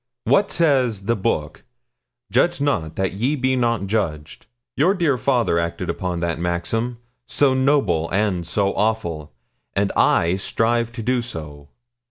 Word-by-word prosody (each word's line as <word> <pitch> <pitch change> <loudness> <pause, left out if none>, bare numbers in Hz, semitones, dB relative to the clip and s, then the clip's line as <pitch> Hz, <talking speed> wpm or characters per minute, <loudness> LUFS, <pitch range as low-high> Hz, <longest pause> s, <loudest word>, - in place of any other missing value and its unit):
What 200 0 +3
says 130 - +1
the 115 +4 +1
Book? 80 -8 -2 0.7
"Judge 170 +7 +2
not, 110 - -1
that 95 -1 -1
ye 120 +9 0
be 130 -1 +1
not 115 -5 0
judged." 85 -7 -3 0.3
Your 180 +8 +3
dear 165 -7 +2
father 115 -6 +1
acted 85 0 -2
upon 90 -2 -3
that 85 -1 -2
maxim 90 +8 -2 0.3
so 140 -2 +2
noble 130 - +2
and 95 -3 0
so 100 +4 0
awful 100 - -1 0.4
and 100 0 +1
I 85 +2 +3
strive 115 +4 0
to 115 -1 -6
do 125 +1 +1
so. 75 -10 -8
110 Hz, 145 wpm, -21 LUFS, 85-125 Hz, 0.7 s, What